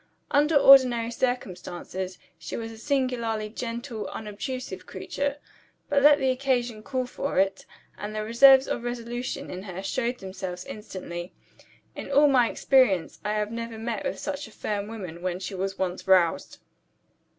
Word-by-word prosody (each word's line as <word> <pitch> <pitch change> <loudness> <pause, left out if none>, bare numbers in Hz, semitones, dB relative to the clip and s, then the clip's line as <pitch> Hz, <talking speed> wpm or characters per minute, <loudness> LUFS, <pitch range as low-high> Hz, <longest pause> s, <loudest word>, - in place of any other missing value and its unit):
Under 295 +2 +3
ordinary 255 -4 +7
circumstances, 190 -6 -3 0.2
she - - -6
was 225 0 -5
a 225 - -11
singularly 235 -5 -1
gentle, 235 0 -5
unobtrusive 225 +5 -6
creature. 285 0 -3 0.5
But 285 -1 +3
let 290 +1 +7
the 265 -2 +2
occasion 250 -4 -1
call 255 +2 -2
for 275 0 -4
it, 195 0 +1 0.3
and 210 +1 -5
the 215 - -2
reserves 265 +4 +7
of - - -2
resolution 240 +3 -4
in 180 - -6
her 190 -1 -7
showed 245 +4 -1
themselves 190 -3 -6
instantly. 185 -4 -7 0.6
In - - -7
all 290 +2 +6
my 255 -4 +4
experience 250 -11 +2
I 210 - -1
have 210 0 -1
never 230 -1 -5
met 225 -2 -3
with 190 - -2
such 285 +2 -4
a - - -15
firm 205 -1 -3
woman, 185 -7 -7
when 180 0 -2
she 195 +1 -5
was 190 +1 -3
once 185 0 -3
roused. 185 -3 +3
230 Hz, 155 wpm, -26 LUFS, 195-255 Hz, 0.6 s, ordinary